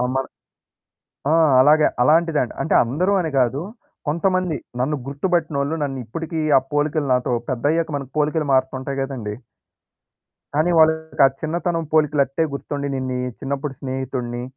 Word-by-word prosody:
ఆ! -, -, +1 dB
మన 135 Hz, 0 st, 0 dB, 1.1 s
ఆ! 160 Hz, -, +5 dB, 0.3 s
అలాగ, 150 Hz, +3 st, +5 dB, 0.2 s
అలాంటిదండి. 155 Hz, -2 st, +3 dB
అంటే -, -, 0 dB
అందరూ 165 Hz, +12 st, 0 dB
అని 160 Hz, -, -3 dB
గాదు, 130 Hz, +3 st, +2 dB, 0.5 s
కొంతమంది 180 Hz, +1 st, 0 dB, 0.2 s
నన్ను 150 Hz, +4 st, 0 dB
గుర్తుబట్టినోళ్ళు, 155 Hz, -1 st, -1 dB
నన్నిప్పడికీ 145 Hz, +5 st, -4 dB, 0.2 s
ఆ -, -, +6 dB
పోలికలు 145 Hz, -1 st, 0 dB
నాతో, 125 Hz, -1 st, 0 dB, 0.2 s
పెద్దయ్యాక 155 Hz, +6 st, 0 dB
మనకు 135 Hz, -2 st, -8 dB
పోలికలు 150 Hz, 0 st, 0 dB
మారుతుంటాయి 130 Hz, +1 st, 0 dB
గదండీ! 120 Hz, -6 st, -4 dB, 1.2 s
కానీ, 155 Hz, +4 st, +2 dB
వాళ్ళకి 160 Hz, 0 st, +3 dB
ఆ -, -, +5 dB
చిన్నతనం 165 Hz, +1 st, -1 dB
పోలికలట్టే 150 Hz, -1 st, +2 dB
గుర్తుండి, 140 Hz, +1 st, -4 dB
నేన్నీ 130 Hz, -1 st, -2 dB, 0.2 s
చిన్నప్పుడు 140 Hz, +1 st, -4 dB
స్నేహితుడిని, 130 Hz, -2 st, -4 dB
145 Hz, 125 wpm, -21 LUFS, 130-160 Hz, 1.2 s, ఆ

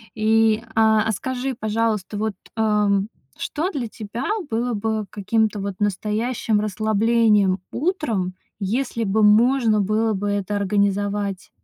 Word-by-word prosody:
и, 220 Hz, 0 st, +3 dB
а, 220 Hz, 0 st, +4 dB
а -, -, +2 dB
скажи, 260 Hz, +5 st, -3 dB
пожалуйста, 215 Hz, -2 st, -1 dB
вот, 215 Hz, 0 st, -1 dB, 0.2 s
ам, 210 Hz, -2 st, +2 dB, 0.3 s
что 325 Hz, +5 st, -2 dB
для 260 Hz, -8 st, -3 dB
тебя 220 Hz, +3 st, -6 dB, 0.2 s
было 235 Hz, +1 st, -1 dB
бы 220 Hz, 0 st, -2 dB
каким-то 215 Hz, +1 st, 0 dB
вот 200 Hz, -1 st, -4 dB
настоящим 210 Hz, +2 st, 0 dB
расслаблением 215 Hz, -1 st, +2 dB
утром, 240 Hz, -, -1 dB, 0.3 s
если 230 Hz, +4 st, -1 dB
бы 215 Hz, +1 st, +1 dB
можно 225 Hz, +1 st, +4 dB
было 215 Hz, +3 st, +1 dB
бы 205 Hz, +1 st, -2 dB
это 205 Hz, 0 st, -1 dB
организовать? 200 Hz, -1 st, -1 dB
215 Hz, 125 wpm, -22 LUFS, 205-225 Hz, 0.3 s, а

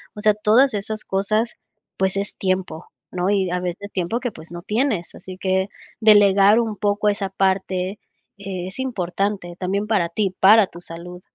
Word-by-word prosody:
O -, -, -8 dB
sea, 215 Hz, 0 st, +4 dB
todas 220 Hz, +5 st, +3 dB
esas 215 Hz, +1 st, -4 dB
cosas, 215 Hz, +4 st, 0 dB, 0.4 s
pues, 190 Hz, 0 st, 0 dB
es 200 Hz, +1 st, -4 dB
tiempo, 185 Hz, -3 st, -2 dB, 0.2 s
¿no?, 180 Hz, +1 st, -1 dB
y 195 Hz, -3 st, +1 dB
a 180 Hz, -, 0 dB
veces 180 Hz, +3 st, -5 dB
tiempo 185 Hz, +5 st, -1 dB
que, 245 Hz, -3 st, -3 dB
pues, 160 Hz, +2 st, -11 dB
no 175 Hz, 0 st, -8 dB
tienes. 215 Hz, -4 st, -1 dB
Así 185 Hz, -1 st, -9 dB
que 190 Hz, +1 st, 0 dB, 0.3 s
delegar 205 Hz, 0 st, +6 dB
un 225 Hz, -2 st, -1 dB
poco 205 Hz, 0 st, 0 dB
esa 200 Hz, -1 st, -1 dB
parte 190 Hz, 0 st, -1 dB, 0.4 s
es 190 Hz, +1 st, -6 dB
importante 195 Hz, -6 st, -2 dB
también 200 Hz, +3 st, -1 dB
para 195 Hz, -6 st, +1 dB
ti, 190 Hz, +1 st, -1 dB
para 210 Hz, 0 st, +7 dB
tu 170 Hz, -, -12 dB
salud. 175 Hz, +1 st, -8 dB
195 Hz, 170 wpm, -21 LUFS, 185-210 Hz, 0.4 s, para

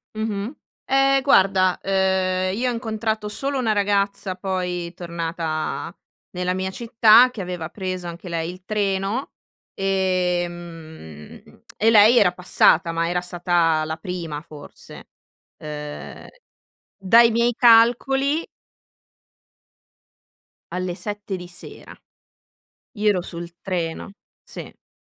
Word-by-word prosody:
Mh-mh. 215 Hz, +2 st, -3 dB, 0.3 s
Eh 270 Hz, 0 st, +3 dB
guarda, 190 Hz, -7 st, +3 dB
uhm, 190 Hz, -1 st, +1 dB
io 245 Hz, +5 st, -1 dB
ho -, -, -1 dB
incontrato 220 Hz, -2 st, -3 dB
solo 275 Hz, +6 st, -3 dB
una 240 Hz, -4 st, +1 dB
ragazza 200 Hz, -2 st, 0 dB
poi 180 Hz, -2 st, -3 dB
tornata 170 Hz, -2 st, -4 dB, 0.4 s
nella 180 Hz, 0 st, -2 dB
mia 190 Hz, 0 st, -2 dB
città, 230 Hz, +3 st, +5 dB
che 225 Hz, -, -7 dB
aveva 180 Hz, -3 st, -5 dB
preso 185 Hz, -3 st, -5 dB
anche 170 Hz, +2 st, -9 dB
lei 165 Hz, -1 st, -3 dB
il 180 Hz, +1 st, -14 dB
treno, 200 Hz, +4 st, -1 dB, 0.4 s
ehm, 175 Hz, -, -4 dB
e 220 Hz, -, +3 dB
lei 220 Hz, +2 st, +7 dB
era 190 Hz, -6 st, +4 dB
passata, 175 Hz, -1 st, +3 dB
ma 165 Hz, 0 st, -1 dB
era 175 Hz, +1 st, -1 dB
stata 175 Hz, -3 st, +1 dB
la 160 Hz, 0 st, -3 dB
prima 165 Hz, -3 st, -6 dB
forse. 150 Hz, -2 st, -13 dB, 0.5 s
Uhm, 150 Hz, -1 st, -8 dB, 0.7 s
dai 230 Hz, +5 st, +5 dB
miei 235 Hz, +2 st, +2 dB
calcoli 265 Hz, +6 st, +4 dB, 2.3 s
Alle 180 Hz, -1 st, -3 dB
7 205 Hz, 0 st, -5 dB
di 180 Hz, -1 st, -9 dB
sera, 175 Hz, -, -10 dB, 1.0 s
io 210 Hz, +1 st, +2 dB
ero 190 Hz, -3 st, +1 dB
sul 170 Hz, -1 st, -8 dB
treno, 175 Hz, -1 st, -4 dB, 0.3 s
sì, -, -, -8 dB
io -, -, -18 dB
185 Hz, 110 wpm, -22 LUFS, 175-215 Hz, 2.3 s, lei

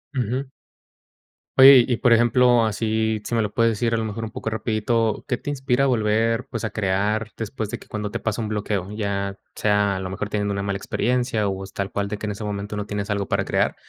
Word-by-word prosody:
Ujú. 130 Hz, +2 st, -2 dB, 1.1 s
Oye 130 Hz, -1 st, +10 dB
y 120 Hz, -3 st, 0 dB
por 120 Hz, -, +4 dB
ejemplo, 120 Hz, 0 st, +4 dB
así 110 Hz, 0 st, 0 dB
si 120 Hz, -, -2 dB
me 115 Hz, -, +2 dB
lo 105 Hz, -1 st, -3 dB
puedes 115 Hz, -1 st, +3 dB
decir 115 Hz, +2 st, -1 dB
a 115 Hz, -, +2 dB
lo 110 Hz, -, -1 dB
mejor 110 Hz, +1 st, -4 dB
un 110 Hz, -, -5 dB
poco 110 Hz, -, -4 dB
rapidito, 110 Hz, 0 st, 0 dB
¿qué 125 Hz, -, +1 dB
te 145 Hz, -, -6 dB
inspira 135 Hz, -2 st, 0 dB
a 140 Hz, -, +3 dB
volver, 115 Hz, +1 st, +1 dB
pues, 115 Hz, -, -4 dB
a 110 Hz, -, -1 dB
crear 105 Hz, +2 st, 0 dB
después 110 Hz, -1 st, -4 dB
de -, -, -4 dB
que -, -, -17 dB
cuando 105 Hz, -1 st, -3 dB
te -, -, -4 dB
pasa 110 Hz, +1 st, -2 dB
un 110 Hz, -, -2 dB
bloqueo 105 Hz, -3 st, -2 dB
ya 100 Hz, -2 st, -3 dB, 0.2 s
sea 105 Hz, -2 st, +1 dB
a -, -, -4 dB
lo 95 Hz, -1 st, -4 dB
mejor 100 Hz, +2 st, -4 dB
teniendo 100 Hz, -1 st, -1 dB
una 100 Hz, 0 st, -2 dB
mala 100 Hz, 0 st, -2 dB
experiencia 120 Hz, 0 st, 0 dB
o 95 Hz, 0 st, -4 dB
es 95 Hz, -, -14 dB
tal 100 Hz, -1 st, -3 dB
cual 100 Hz, 0 st, -2 dB
de 105 Hz, -, -4 dB
que 105 Hz, -, -6 dB
en -, -, -2 dB
ese 105 Hz, +1 st, -6 dB
momento 105 Hz, 0 st, -4 dB
no 105 Hz, -, -3 dB
tienes 100 Hz, 0 st, -4 dB
algo 100 Hz, -1 st, -1 dB
para -, -, 0 dB
crear, -, -, 0 dB
110 Hz, 240 wpm, -23 LUFS, 100-115 Hz, 1.1 s, Oye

